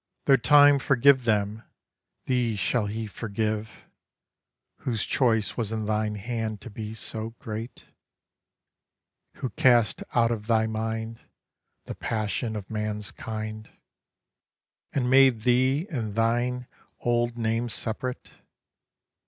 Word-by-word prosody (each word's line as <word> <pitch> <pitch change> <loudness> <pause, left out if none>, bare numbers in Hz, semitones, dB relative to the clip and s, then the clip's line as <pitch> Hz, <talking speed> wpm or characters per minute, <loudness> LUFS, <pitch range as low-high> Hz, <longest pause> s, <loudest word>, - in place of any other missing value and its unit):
Though 135 - +6
time 145 +2 +6
forgive 135 -1 +4
them, 105 -1 +1 0.6
thee 125 -3 +1
shall 105 +1 0
he 110 +2 -3
forgive, 110 0 -4 0.9
Whose 115 -4 -2
choice 115 -5 +1
was 115 -3 -2
in 110 -1 -2
thine 105 0 0
hand 110 0 -3
to 120 - -9
be 110 +1 -6
so 110 +1 -6
great? 110 +2 -7 1.5
Who 130 - -4
cast 120 -4 +3
out 120 -1 +4
of 110 -2 -4
thy 110 -1 +3
mind 110 +1 -3 0.7
The - - -5
passion 110 +1 -2
of 105 -3 -6
man's 105 -1 -3
kind, 110 -1 -6 1.2
And 130 -3 0
made 130 -3 +5
thee 130 +6 +2
and 110 -8 -3
thine 120 +2 +1 0.4
old 120 0 0
name 115 +1 0
separate? 120 +3 -4
115 Hz, 115 wpm, -26 LUFS, 110-125 Hz, 1.5 s, Though